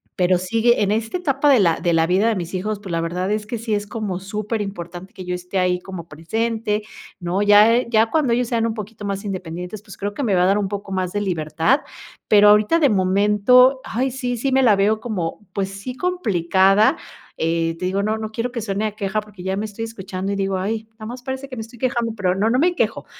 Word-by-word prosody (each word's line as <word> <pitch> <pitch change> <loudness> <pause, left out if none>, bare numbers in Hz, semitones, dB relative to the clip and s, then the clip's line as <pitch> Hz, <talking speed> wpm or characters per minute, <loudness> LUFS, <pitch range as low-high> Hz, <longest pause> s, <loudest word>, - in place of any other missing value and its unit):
pero 180 0 +3
sigue 225 +6 +2
en 200 - +1
esta 225 +8 -1
etapa 290 -4 +1
de 265 -4 +6
la 170 -5 +3
de 175 - 0
la 165 0 +3
vida 185 +6 +2
de 230 - +2
mis 180 -1 -5
hijos, 200 +3 -2
pues 200 -3 -8
la 165 -1 0
verdad 180 +4 -2
es 210 0 -2
que 235 - -3
sí 225 0 -3
es 205 0 -1
como 205 -5 -4
superimportante 195 -3 -5
que 185 - -9
yo 180 - -3
esté 180 +2 -4
ahí 180 0 +1
como 180 -3 -8
presente, 215 +6 -2 0.4
¿no?, 180 +2 -1
ya 210 +4 +5
ya 225 -1 +3
cuando 295 -7 +2
ellos 245 0 +1
sean 230 -1 0
un 225 - -2
poquito 210 -1 -7
más 200 0 -3
independientes, 180 +1 -5
pues 210 -2 -13
creo 205 +1 -3
que 280 - -4
me 210 -6 +2
va 180 - +3
a - - +4
dar 195 +2 +3
un 200 - -1
poco 200 0 -6
más 185 -1 -2
de 205 - -1
libertad, 175 - +1 0.5
pero 205 -1 +6
ahorita 210 +10 +4
de 290 -4 +4
momento, 210 +7 +4
ay, 260 +2 -1
sí 250 -1 -3
sí 270 +4 -1
me 265 0 +4
la 220 -5 +6
veo 205 +2 +2
como, 210 -4 -4
pues 195 -1 -1
sí, 200 +6 -7
complicada, 195 - +2 0.4
eh 165 0 0
te - - -3
digo 195 +2 0
no 215 +1 -1
no 220 0 -4
quiero 235 +2 -3
que 240 -2 -4
suene 205 0 -2
a 215 - -1
queja 200 -1 -1
porque 210 -3 -11
ya 190 +1 -2
me 210 - -2
estoy 220 +1 -5
escuchando 195 -3 -5
y - - -1
digo: 195 -1 -1
"Ay, 215 +4 -3
nada 220 -1 -9
más 245 +2 -8
parece 265 +1 -5
que 255 - -7
me 225 - -5
estoy 230 +1 -14
quejando", 235 -2 -1
pero 185 -4 0
no 205 +3 +1
no 250 - +2
me 350 +4 +2
quejo. - - -1
205 Hz, 245 wpm, -21 LUFS, 185-230 Hz, 0.5 s, de